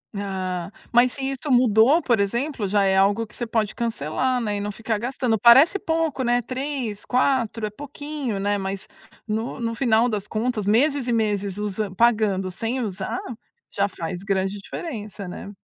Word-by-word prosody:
Ah, 185 -2 -3 0.2
mas 245 +1 +5
se 275 - -5
isso 270 +2 -3
mudou, 245 +5 +5
por 235 -8 +2
exemplo, 235 +3 -1
já 200 +1 +2
é 190 0 +3
algo 205 +4 +3
que - - -15
você 240 - -3
pode 220 -2 -1
cancelar, 235 - -1
né, 210 -3 -1
e - - -3
não 205 +1 -3
ficar 220 +1 -2
gastando. 240 0 -1
Parece 265 - +7
pouco, 325 -7 -1
né, 245 0 +2
3, 255 -3 -4
4, 250 -3 +1
é - - -5
pouquinho, 285 -1 -5
né, 205 +1 0
mas 195 0 -4 0.4
no 220 +2 -3
no 230 -1 -2
final 235 -1 +3
das 210 -2 -2
contas, 220 -1 -1
meses 260 +5 +2
e 240 - +1
meses 205 -3 0
usa 210 -1 -2
pagando 210 -4 +2
sem 230 +7 -2
usar, 210 +1 -3 0.5
já 200 0 0
faz 180 -1 -5
grande 195 0 -1
diferença, 210 - -6
né. 180 +3 -7
225 Hz, 175 wpm, -23 LUFS, 200-250 Hz, 0.5 s, Parece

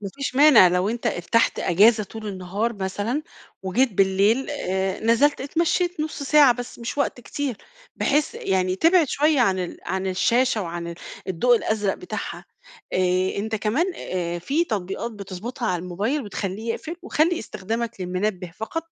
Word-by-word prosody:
ما 200 - -5
فيش 275 -2 -4
مانع 270 -9 +8
لو 180 +2 +1
أنت 235 +2 -3
ارتحت 205 +7 +1
إجازة 215 +5 +4
طول 220 +2 -9
النهار 195 +4 -2
مثلًا، 205 +7 -2 0.4
وجيت 220 +6 +1
بالليل 195 +8 +2
آآ 190 -8 -2
نزلت 235 +6 +3
اتمشيت 340 +4 0
نُص 305 -1 -4
ساعة 285 -2 +6
بس 245 0 -8
مش 235 +4 -5
وقت 255 - 0
كتير، 265 -1 -4 0.4
بحيث 295 +1 +1
يعني 185 -1 0
تبعد 330 - +4
شوية 300 0 +2
عن 195 -6 +3
ال 180 -1 -4
عن 190 +1 -2
الشاشة 230 +4 +2
وعن 170 0 -5
ال 170 - -6 0.3
الضوء 235 +7 +3
الأزرق 210 -3 0
بتاعها، 360 - -6 0.5
آآ 185 +1 +1
أنت 220 +2 -2
كمان 225 - 0
آآ 175 -1 -3
فيه 290 - 0
تطبيقات 205 +2 -3
بتضبطها 210 +5 -6
على 180 -2 -1
الموبايل، 205 +11 -2
بتخلّيه 205 +2 -4
يقفل، 330 +2 -7
وخلّي 340 -1 +1
استخدامك 220 +3 -4
للمنبه 185 0 -2
فقط 275 +9 -4
215 Hz, 155 wpm, -23 LUFS, 185-270 Hz, 0.5 s, مانع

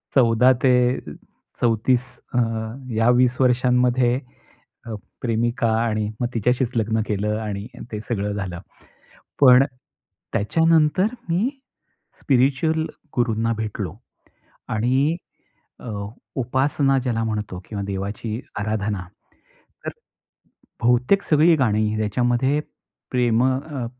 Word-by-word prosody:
14 125 0 +5
ते 130 - +5 0.9
34 120 +2 +2 0.3
अ, - - 0 0.6
या 115 +2 +3
20 125 0 +3
वर्षांमध्ये, 125 -1 +3 0.7
अ, 115 -2 -5 0.3
प्रेमिका 115 0 0
आणि 110 -2 0
मग 120 - +1
तिच्याशीच 125 +2 +1
लग्न 110 0 +1
केलं 105 +1 -1
आणि 105 -1 -4 0.2
ते 105 - -3
सगळं 105 -2 -1
झालं. 95 -4 -4 0.8
पण 130 -1 +8 0.7
त्याच्यानंतर 160 - +3 0.2
मी 185 +8 +1 0.7
स्पिरिच्युअल 140 +4 +2 0.3
गुरूंना 115 -2 +1
भेटलो 105 -4 -4 0.8
आणि 130 +8 +2 0.6
अ, - - -9 0.5
उपासना 135 +2 +1
ज्याला 120 -3 -1
म्हणतो 105 -4 -3
किंवा 100 -2 -4
देवाची 100 +4 -4 0.2
आराधना. 105 -2 -2 0.8
तर - - -1 0.9
बहुतेक 125 +11 +3
सगळी 160 +2 +5
गाणी 110 -4 +1
त्याच्यामध्ये, 120 +6 +1 0.5
प्रेम 120 -2 +2
अ, 130 0 -2
120 Hz, 100 wpm, -22 LUFS, 110-130 Hz, 0.9 s, पण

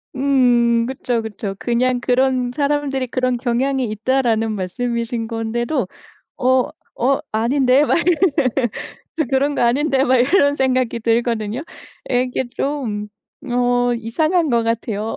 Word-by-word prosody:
음. 245 -4 +3
그쵸, 250 -3 -2
그쵸. 210 -2 -5
그냥 245 +2 +1
"그런 255 0 +1
사람들이 280 -1 -1
그런 255 0 0
경향이 255 +2 0
있다."라는 225 0 0
말씀이신 230 +4 -3
건데도 235 +2 -2 0.5
어 255 0 +2 0.2
어 270 +2 +1
아닌데 255 +5 +3
막 - - +2
이런 355 +1 +3 0.9
저 315 - +2
그런 280 +2 +1
거 - - -2
아닌데 270 +3 +2
막 260 0 +3
이런 285 +3 +3
생각이 255 -3 0
들거든요. 230 0 0 0.5
이게 250 +1 0
좀 230 -8 -2 0.4
어 245 0 +2
이상한 310 +9 0
것 235 -1 +2
같아요. 225 -1 -2
245 Hz, 255 characters per minute, -19 LUFS, 230-265 Hz, 0.9 s, 음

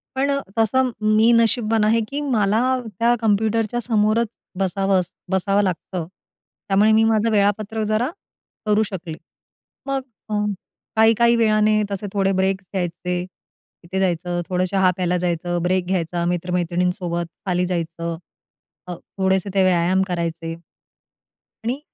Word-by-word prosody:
पण 275 +2 +1 0.3
तसं 255 +4 +2 0.3
मी 225 +2 +5
नशिबवान 225 -1 +3
आहे, 220 +2 +3
की 285 +4 -4
मला 220 -6 +1 0.4
त्या 235 +1 +4
कॉम्प्युटरच्या 220 +1 +1
समोरच 220 0 +2 0.3
बसावंस 195 -1 0 0.2
बसावं 195 +2 +2
लागतं, 180 -2 -3 0.6
त्यामुळे 205 +2 +4
मी 220 +1 +5
माझं 225 0 +2
वेळापत्रक 210 +1 +1
जरा 220 +5 +1 0.6
करू 210 0 +3
शकले. 175 -5 -6 0.7
मग 275 -1 -1 0.3
अ, - - -3 0.6
काही, 220 +1 +6
काही 235 0 +4
वेळाने 215 -1 +3
तसे 200 +1 -3
थोडे 195 -1 +2
ब्रेक्स 190 0 0
घ्यायचे, 180 -1 -2 0.6
तिथे 185 +3 -3
जायचं, 175 -1 0
थोडं 185 0 +1
चहा 190 -2 +3
प्यायला 180 -1 0
जायचं, 175 0 -1
ब्रेक 180 0 +1
घ्यायचा, 175 -2 -1
मित्र-मैत्रिणींसोबत 175 0 -1 0.2
खाली 180 -1 +1
जायचं, 170 -1 -3 0.7
अ, 180 - -4 0.2
थोडेसे 190 0 +1
ते 195 -1 +3
व्यायाम 185 +1 +3
करायचे 165 -2 -3 1.1
आणि 245 +5 -2
195 Hz, 125 wpm, -21 LUFS, 180-220 Hz, 1.1 s, काही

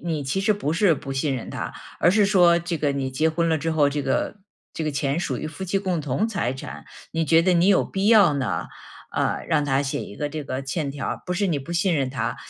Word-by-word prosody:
你 160 -4 -2
其 190 +9 -1
实 210 +2 +3
不 180 -7 -2
是 175 0 +4
不 135 -1 -6
信 135 +1 0
任 120 - -7
他， - - -5 0.3
而 175 - +5
是 205 0 +4
说 175 -4 +5
这 170 0 -3
个 145 -2 0
你 135 -1 -2
结 155 +5 +1
婚 165 +1 0
了 160 - +2
之 165 +2 -2
后， 150 -3 +3
这 145 0 -2
个 135 +10 -1 0.4
这 160 - -3
个 155 - -1
钱 140 +3 -1
属 175 - -2
于 - - -4
夫 160 +4 -8
妻 195 +2 0
共 185 -4 -1
同 150 - 0
财 175 - -1
产， 75 - -8 0.3
你 165 0 0
觉 165 +2 +4
得 185 +1 +3
你 175 +3 +4
有 195 - +4
必 195 +2 -1
要 200 -9 +6
呢， 135 -4 -2 0.5
呃， - - -1
让 145 - +2
他 135 -1 +1
写 135 - -2
一 100 - -10
个 145 - -2
这 155 0 -5
个 135 -1 -4
欠 140 +1 -3
条 140 0 -5
儿。 - - -4
不 180 - -3
是 200 +2 0
你 150 -6 0
不 170 +6 -7
信 180 +1 +2
任 135 -4 0
他， 135 - -2
160 Hz, 285 characters per minute, -24 LUFS, 140-180 Hz, 0.5 s, 要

